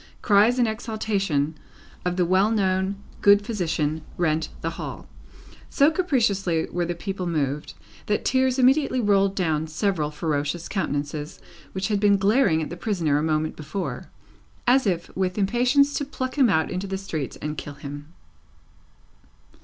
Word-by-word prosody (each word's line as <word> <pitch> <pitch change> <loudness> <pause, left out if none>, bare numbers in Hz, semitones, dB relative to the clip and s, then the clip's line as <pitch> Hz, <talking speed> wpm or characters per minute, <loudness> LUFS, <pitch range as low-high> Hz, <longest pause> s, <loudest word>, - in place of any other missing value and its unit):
Cries 215 +3 +4
in 245 - +4
exaltation 205 -9 -1 0.5
of 180 0 -1
the 180 -1 +2
well 190 +4 +3
known 190 -2 +1 0.3
good 205 0 +6
physician 165 -7 -1 0.2
rent 160 -2 0
the 165 - -2
hall. - - -7 0.6
So 285 +2 +4
capriciously 215 - +1
were 175 0 -1
the 175 - -2
people 190 0 -4
moved, 150 -3 -2 0.3
that 210 - 0
tears 260 0 +2
immediately 265 +1 +3
rolled 200 -3 +2
down 160 -4 0
several 160 -2 -1
ferocious 150 +1 -2
countenances 150 -4 -3 0.3
which 190 +1 -2
had 205 -2 +1
been 200 -1 +4
glaring 195 -5 +3
at - - -6
the 175 - -6
prisoner 170 -9 0
a - - -1
moment 155 0 0
before, 155 +6 -5 0.6
as 250 -1 +4
if 175 -3 -2
with 185 0 -1
impatience 250 +8 +3
to - - -2
pluck 260 -2 -4
him 265 -5 +4
out 160 -4 +1
into 185 +2 -3
the 195 0 -3
streets 160 -8 -4
and 150 0 -5
kill 145 - -8
him. 145 +2 -9
190 Hz, 155 wpm, -24 LUFS, 160-215 Hz, 0.6 s, good